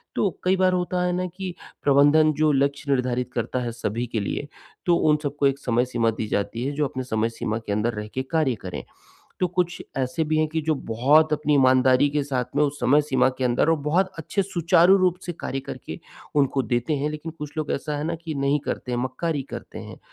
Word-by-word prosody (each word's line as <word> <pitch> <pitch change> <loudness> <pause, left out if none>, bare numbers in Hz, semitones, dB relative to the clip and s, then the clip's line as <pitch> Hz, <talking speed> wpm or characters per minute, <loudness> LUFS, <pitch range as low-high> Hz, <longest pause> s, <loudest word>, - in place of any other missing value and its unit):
तो 200 - +2
कई 185 +1 +3
बार 185 -1 +3
होता 180 0 0
है 180 - +1
ना 180 +1 -1
कि 185 -2 -5 0.3
प्रबंधन 145 +2 +5
जो 155 +1 +2
लक्ष्य 140 +1 0
निर्धारित 125 -2 0
करता 120 +1 -2
है 120 - -3
सभी 115 +1 -3
के 115 -1 -2
लिए, 105 +7 -3 0.4
तो 175 -1 +4
उन 150 -2 +3
सबको 145 0 +1
एक 135 0 -1
समय 120 -2 +1
सीमा 120 -2 +1
दी 110 0 -4
जाती 115 +4 -2
है, 140 - -1
जो 145 +1 0
अपने 130 -1 -5
समय 110 -2 0
सीमा 115 -1 -3
के 110 -2 -6
अंदर 105 +3 0
रह 105 -1 -5
के 130 - -2
कार्य 155 -6 +2
करें। 90 -1 -6 0.6
तो 180 - +3
कुछ 175 0 -1
ऐसे 130 +4 -1
भी 155 +1 0
हैं 155 - +3
कि 160 +1 -2
जो 155 0 +1
बहुत 145 +8 +4
अपनी 150 0 +1
ईमानदारी 130 0 +4
के 150 0 0
साथ 130 -3 -1
में 150 - +4
उस 145 0 -2
समय-सीमा 145 -1 +3
के 130 - -1
अंदर 125 +4 +2
और 165 - +3
बहुत 185 +5 +2
अच्छे 195 +5 -1
सुचारू 175 0 +4
रूप 185 -2 +2
से 175 - -2
कार्य 135 - -3
करके - - -8 0.4
उनको 140 -1 +2
देते 120 +4 0
हैं 145 +2 -1
लेकिन 155 +2 -6
कुछ 150 -1 -6
लोग 155 -1 -2
ऐसा 150 +1 -3
है 145 - -3
ना 165 +1 -1
कि 165 -1 -6
नहीं 140 +1 +1
करते 125 - -4
हैं, 120 - 0
मक्कारी 135 +4 -2
करते - - -8
हैं - - -9
145 Hz, 225 wpm, -24 LUFS, 125-160 Hz, 0.6 s, प्रबंधन